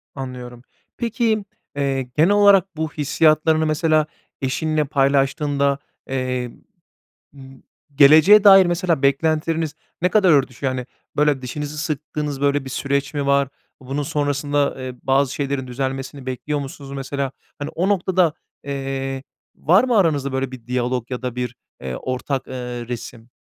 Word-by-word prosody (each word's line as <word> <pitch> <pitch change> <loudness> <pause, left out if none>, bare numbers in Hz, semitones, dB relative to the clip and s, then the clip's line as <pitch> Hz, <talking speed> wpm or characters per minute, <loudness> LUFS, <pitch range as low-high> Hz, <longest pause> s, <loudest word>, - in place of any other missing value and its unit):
Anlıyorum. 125 -2 -7 0.4
Peki, 230 -3 0 0.3
eee, 140 -2 0
genel 140 +7 +1
olarak 200 -3 +5
bu 160 -1 -3
hissiyatlarını 155 +2 +2
mesela 155 0 +2 0.4
eşinle 150 +4 0
paylaştığında, 140 0 +1 0.3
eee, 125 -2 -2 0.8
ımm, 135 -1 -14 0.3
geleceğe 155 +9 +7
dair 195 -2 +9
mesela 175 -3 0
beklentileriniz 155 +3 +1 0.3
ne 180 - +4
kadar 190 -3 +4
örtüşüyor? 135 -2 +1
Hani, 125 -1 -4 0.3
böyle, 145 -3 +2
dişinizi 150 +4 -5
sıktığınız, 150 -2 -3
böyle, 140 0 +1
bir 135 - -7
süreç 140 +2 -2
mi 145 -1 -1
var? 140 -1 +3 0.3
Bunun 135 +3 -3
sonrasında, 145 0 0
eee, 130 -1 -6
bazı 135 0 +2
şeylerin 140 -2 -2
düzelmesini 135 +1 -4
bekliyor 140 +3 -3
musunuz 140 0 -8
mesela? 135 0 -3 0.3
Hani, 145 - -4
o 185 +3 0
noktada, 185 -4 +2 0.3
eee, 135 -1 -4 0.3
var 185 - +4
mı 250 -3 +1
aranızda 145 -7 +1
böyle 130 0 -1
bir 125 -3 -11
diyalog 125 -1 -2
ya 125 -1 -4
da 125 -1 -4
bir, 125 -1 -3 0.3
eee, 65 -1 -5
ortak, 130 - -3
eee, - - -8 0.3
resim? 120 -1 -7
140 Hz, 140 wpm, -21 LUFS, 130-155 Hz, 0.8 s, dair